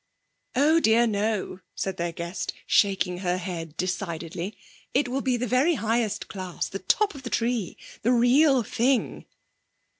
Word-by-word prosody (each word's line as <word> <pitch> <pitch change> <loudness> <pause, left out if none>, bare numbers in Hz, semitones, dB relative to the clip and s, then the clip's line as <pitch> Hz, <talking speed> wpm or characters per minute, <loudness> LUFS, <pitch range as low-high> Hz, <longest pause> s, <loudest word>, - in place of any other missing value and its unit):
'Oh 300 +5 +4
dear, 230 -4 +4
no,' 210 -3 -1 0.2
said 190 -1 -3
their 170 0 -1
guest, 170 +2 -4
shaking 190 -3 +2
her 180 -1 0
head 165 -4 -6
decidedly. 175 0 -3 0.4
'It 275 0 +3
will 260 +2 -2
be 255 -2 +1
the 245 - -1
very 260 +8 +3
highest 225 -3 -1
class, 185 -4 -4
the 195 - -6
top 410 - +2
of 280 - -10
the 250 - -6
tree! 230 -5 -1 0.2
The 235 - +2
real 255 +2 +4
thing!' 245 +4 0
220 Hz, 150 wpm, -26 LUFS, 185-250 Hz, 0.4 s, Oh